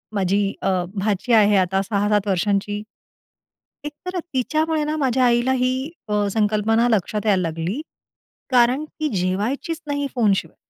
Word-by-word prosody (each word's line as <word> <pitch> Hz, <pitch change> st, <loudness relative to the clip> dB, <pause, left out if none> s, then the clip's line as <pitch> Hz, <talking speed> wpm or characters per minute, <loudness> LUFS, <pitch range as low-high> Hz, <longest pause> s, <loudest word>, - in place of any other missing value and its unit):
माझी 195 Hz, +1 st, +1 dB
अ, -, -, 0 dB, 0.3 s
भाची 205 Hz, +4 st, 0 dB
आहे 210 Hz, -2 st, +5 dB
आता 190 Hz, +1 st, +2 dB
6-7 205 Hz, 0 st, 0 dB
वर्षांची. 200 Hz, +2 st, 0 dB, 1.0 s
एक 295 Hz, -, -4 dB
तर 365 Hz, 0 st, -3 dB
तिच्यामुळे 310 Hz, +4 st, 0 dB
ना, 300 Hz, +1 st, -2 dB
माझ्या 260 Hz, -3 st, +2 dB
आईला 240 Hz, +1 st, +2 dB
ही 255 Hz, 0 st, +2 dB, 0.3 s
अ, 210 Hz, -1 st, +1 dB
संकल्पना 220 Hz, +2 st, +2 dB
लक्षात 210 Hz, 0 st, 0 dB
यायला 200 Hz, -3 st, +3 dB
लागली. 165 Hz, -, -3 dB, 0.7 s
कारण 250 Hz, +3 st, +4 dB
ती 310 Hz, 0 st, -4 dB
जेवायचीच 215 Hz, -, -2 dB
नाही 285 Hz, 0 st, -1 dB
फोनशिवाय. 210 Hz, -5 st, +1 dB
215 Hz, 135 wpm, -22 LUFS, 200-260 Hz, 1.0 s, आहे